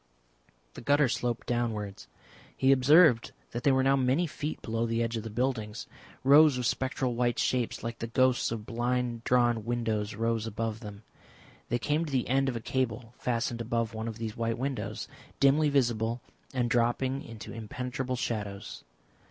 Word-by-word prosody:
The - - -9
gutter 145 +2 +3
sloped 120 -1 -2
downwards. 110 - -2 0.5
He 135 0 +4
observed 135 -1 +5 0.2
that 120 - -4
they 140 - +5
were 130 0 +3
now 135 +1 +4
many 135 +6 +2
feet 155 -1 -4
below 115 0 -1
the 115 0 0
edge 115 0 -2
of 110 - -2
the 115 - -6
buildings. 110 -2 -2 0.4
Rows 145 +1 +7
of 125 - -2
spectral 130 0 0
white 120 0 0
shapes 125 -4 0
like 115 0 -4
the 115 - -3
ghosts 130 +1 +2
of 110 -2 -4
blind 120 0 -1
drawn 120 -3 +3
windows 110 -3 -1
rose 115 0 -1
above 115 0 -3
them. 105 -2 -9 0.7
They 120 - +1
came 150 +6 0
to 150 - -6
the 130 -3 0
end 135 +2 +2
of 125 - -3
a 115 - -3
cable 115 -2 -2
fastened 120 -1 -1
above 115 -1 -1
one 110 +1 -4
of 110 -1 -5
these 110 -2 -4
white 115 0 -1
windows, 120 -5 -3 0.3
dimly 145 +2 +4
visible 120 -4 +1 0.3
and 125 -2 0
dropping 120 +3 +1
into 115 -5 -9
impenetrable 125 +3 -4
shadows. 105 -5 -4
120 Hz, 170 wpm, -29 LUFS, 115-130 Hz, 0.7 s, Rows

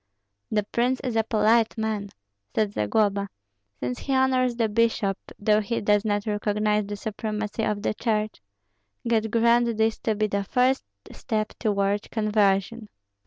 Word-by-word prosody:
"The 210 -1 +1
prince 245 +5 0
is 250 -4 -3
a 225 - +3
polite 225 +1 +2
man," 215 -2 -2 0.5
said 210 -2 +1
Zagloba, 200 - +1 0.5
"since 125 0 -3
he 270 - -1
honors 255 -2 +2
the 230 -1 +1
bishop, 220 -2 +1 0.2
though 210 +1 +3
he 230 +3 -2
does 205 0 +2
not 205 -2 -1
recognize 210 0 0
the 205 - -4
supremacy 215 +1 -4
of 210 -1 -1
the - - 0
Church. 215 - -2 0.7
God 225 -1 +1
grant 235 0 +3
this 220 0 +1
to 220 - -1
be 215 +1 +1
the 200 -1 -1
first 255 +6 +1 0.3
step 215 -1 -2
toward 200 -2 0
conversion!" 210 0 +1
215 Hz, 150 wpm, -25 LUFS, 205-230 Hz, 0.7 s, a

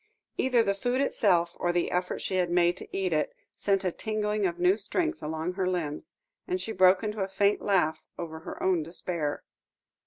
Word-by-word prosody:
Either 250 -3 +3
the 200 - +1
food 245 +6 -1
itself, 175 -10 +2
or 175 - +1
the 175 0 0
effort 180 0 -1
she 185 - -1
had 180 -1 +1
made 175 0 +3
to - - -9
eat 190 -3 -1
it, 155 -1 0 0.2
sent 195 -1 +1
a 180 - +1
tingling 210 0 -1
of 170 -1 -4
new 180 +2 +4
strength 320 - -2
along 160 +3 -3
her 185 -1 -1
limbs, 165 - -3 0.3
and 365 0 -1
she 225 - -4
broke 185 0 +5
into 210 -1 -2
a 190 - 0
faint 200 +1 +2
laugh 180 -6 +1
over 160 -2 -6
her 160 - -7
own 185 -3 +3
despair. 165 -2 -2
185 Hz, 195 wpm, -28 LUFS, 175-210 Hz, 0.3 s, broke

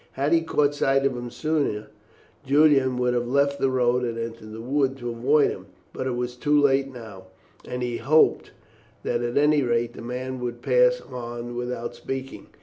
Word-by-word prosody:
Had 140 +4 0
he 165 - +4
caught 150 -3 +1
sight 135 -1 +1
of 135 -2 +1
him 120 0 -5
sooner 140 -8 -2 0.5
Julian 140 -2 +4
would 125 0 +1
have 120 0 -1
left 140 +2 +1
the 135 - +2
road 125 -1 +1
and 115 -1 -2
entered 115 -1 -6
the 110 - -8
wood 135 +2 0
to 120 -2 -4
avoid 140 +6 +3
him, 95 +1 -9 0.3
but 130 - -3
it 125 - -1
was 125 0 -3
too 145 +4 +2
late 135 -1 +2
now, 110 -7 -11 0.4
and 125 0 -4
he 120 -1 -2
hoped 155 +6 +3 0.5
that 120 0 -1
at 120 +1 -2
any 150 +1 +4
rate 120 -2 0
the - - -10
man 125 +2 -5
would 120 -1 -5
pass - - +3
on 120 0 -7
without 120 -1 -4
speaking. 130 +2 -6
125 Hz, 190 wpm, -24 LUFS, 120-140 Hz, 0.5 s, he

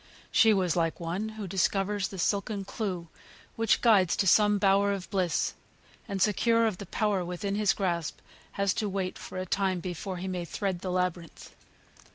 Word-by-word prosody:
She 225 - +6
was 190 -4 +2
like 165 -2 0
one 180 +6 -3
who 210 - -4
discovers 195 +1 0
the 195 - -9
silken 200 +2 -1
clue 185 -6 -4 0.5
which 225 -1 +2
guides 200 -7 +4
to 200 - +1
some 210 +2 +5
bower 200 0 +3
of 190 -2 -5
bliss, 185 -4 0 0.5
and 200 -3 -3
secure 230 +4 +3
of 215 -5 -1
the 200 - -7
power 205 -2 0
within 180 +3 -3
his 205 -1 +3
grasp, 170 -5 -2 0.4
has 200 -1 +1
to 210 - -2
wait 190 -1 -3
for - - -8
a 185 - -2
time 190 0 0
before 180 +2 -5
he 185 +2 -5
may 180 -2 -3
tread 190 +1 -2
the 185 - -5
labyrinth. 180 -2 -3
195 Hz, 180 wpm, -28 LUFS, 180-205 Hz, 0.5 s, She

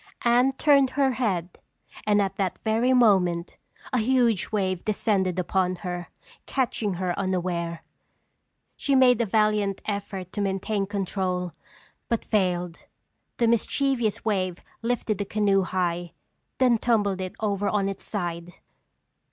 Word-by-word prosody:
Anne 245 +2 +4
turned 275 -1 +4
her 270 0 +2
head 190 -9 -2 0.5
and 205 -1 +4
at 195 - -3
that 190 -3 -1
very 225 +3 +2
moment 190 -8 +3 0.4
a 250 - +3
huge 235 -4 +2
wave 190 -4 -1
descended 195 -4 0
upon 185 0 0
her, 175 -1 -5 0.4
catching 230 -7 -1
her 180 0 -1
unaware. 175 -3 -2 0.9
She 275 - 0
made 250 -3 +5
a 230 - 0
valiant 210 -1 +1
effort 200 -3 -4
to 205 - -2
maintain 195 +1 -1
control, 185 -3 -2 0.6
but 230 -2 -1
failed. 180 -4 0 0.6
The 235 - +2
mischievous 235 -1 0
wave 185 -5 0 0.2
lifted 230 -3 -1
the - - 0
canoe 200 -1 +2
high, 175 -2 -2 0.4
then 245 -3 +4
tumbled 205 -5 +1
it 185 -1 -5
over 205 -2 0
on 200 -2 +1
its 195 -1 -5
side! 175 -3 -4
200 Hz, 130 wpm, -25 LUFS, 185-230 Hz, 0.9 s, made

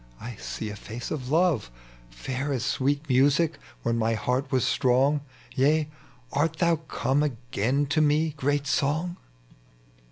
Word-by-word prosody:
I 120 0 -7
see - - -5
a - - -6
face 115 +3 -7
of 130 -5 -4
love, 165 - +2 0.4
Fair 130 - -4
as 130 -5 -1
sweet 145 +3 0
music 145 +4 +3 0.2
when 115 0 0
my 115 0 +1
heart 130 +5 -1
was 130 -2 +2
strong: 135 +4 +3 0.3
Tea 150 +3 +3 0.2
— 125 0 -29
art 150 +3 +2
thou 170 0 +2
come 145 -3 -1
again 130 0 0
to 145 +2 +1
me, 155 +1 +2
great 145 0 0
Song?" 155 +5 0
140 Hz, 150 wpm, -26 LUFS, 125-150 Hz, 0.4 s, music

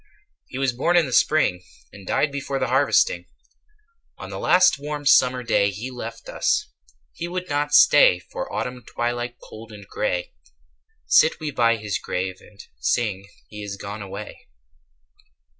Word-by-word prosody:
He 130 - -8
was 135 -2 0
born 170 +8 +1
in 170 - +4
the 130 - -6
Spring, 135 -14 +2 0.3
And 100 -2 -13
died 145 - +1
before 140 0 -3
the 135 - -1
harvesting: 145 - +2 0.9
On - - -9
the - - -6
last 180 -4 +4
warm 145 0 -5
summer 125 -2 +4
day 115 -4 +2
10 - - -7
He 115 +6 -6
left 115 -2 -8
us; - - 0 0.4
he 170 - -5
would 180 +1 -4
not 145 +1 +1
stay 145 -10 +7
For 90 - -7
Autumn 125 +2 -4
twilight 120 0 -3
cold 110 +1 -11
and 100 -2 -12
grey. 90 -4 -2 0.7
Sit 110 - +4
we 155 -2 -4
by 115 -3 +3
his 105 -3 -3
grave, 95 0 -3
and 105 -1 -19 0.2
sing 100 - -1 0.2
He 105 0 -9
is 100 -1 -6
gone 100 +1 -7
away. 100 +1 -9
120 Hz, 160 wpm, -23 LUFS, 100-145 Hz, 0.9 s, stay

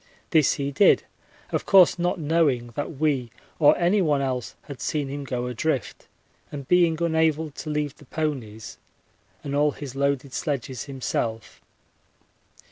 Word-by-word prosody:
This 155 -5 +4
he 140 0 -3
did, 145 +9 +5 0.5
of - - -2
course 185 -3 +6
not 175 +1 0
knowing 145 -6 +1
that 145 +4 -5
we 140 -6 +1 0.3
or 145 -2 +6
anyone 175 -5 +2
else 130 -3 -3
had 140 -3 -9
seen 145 -3 -2
him 140 +1 -5
go 125 -2 -3
adrift, 125 +3 -3 0.4
and 140 -3 -7
being 170 -3 +3
unable 160 -1 +1
to 155 - -7
leave 150 -1 -2
the 145 - -17
ponies 125 -8 -4 0.6
and 140 - -4
all 145 0 +3
his 140 -3 -8
loaded 140 -1 -1
sledges 135 -4 -3
himself. 115 -5 -4
145 Hz, 140 wpm, -25 LUFS, 130-160 Hz, 0.6 s, course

